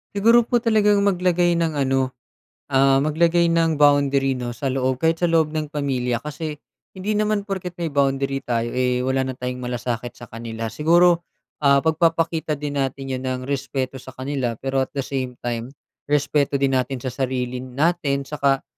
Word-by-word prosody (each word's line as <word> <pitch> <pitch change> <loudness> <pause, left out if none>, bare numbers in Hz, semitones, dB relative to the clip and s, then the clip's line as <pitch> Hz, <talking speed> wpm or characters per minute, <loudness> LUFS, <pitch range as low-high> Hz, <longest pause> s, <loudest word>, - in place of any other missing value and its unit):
Siguro 230 +4 +5
po 240 +1 +1
talagang 210 -3 +3
maglagay 180 -2 +2
ng 160 -3 -1
ano, 130 -1 0 0.5
ah, 135 0 +4
maglagay 170 +3 +2
ng 165 -1 +2
boundary 140 -2 +3
'no, 120 -1 -4
sa 135 +2 -2
loob 130 -1 -1
kahit 165 0 +2
sa 175 - +2
loob 165 -2 +2
ng 155 -1 -2
pamilya. 125 -4 -1
Kasi 150 +1 -5 0.4
hindi 205 +3 -2
naman 215 -1 +1
porket 190 -3 -5
may 170 -2 -2
boundary 135 -1 +1
tayo 120 -1 -1
eh, 125 0 0
wala 130 +1 0
na 130 - -4
tayong 125 0 -4
malasakit 120 -1 -3
sa 120 - -13
kanila. 115 0 -5
Siguro, 170 +5 +3 0.4
ah, 140 0 +5
pagpapakita 160 0 +1
din 145 0 -4
natin 135 0 -2
'yon 130 0 -3
ng 130 0 -2
respeto 135 -1 -3
sa 130 0 -12
kanila 130 -3 -2
pero 135 +4 -3
at - - -40
the 140 - -1
same 130 -2 -4
time, 120 +2 -4 0.3
respeto 145 0 +1
din 135 -1 +2
natin 125 0 -3
sa 130 - -3
sarili 125 -1 -2
natin. 140 +2 0
Tsaka 140 -1 0
140 Hz, 175 wpm, -22 LUFS, 130-165 Hz, 0.5 s, Siguro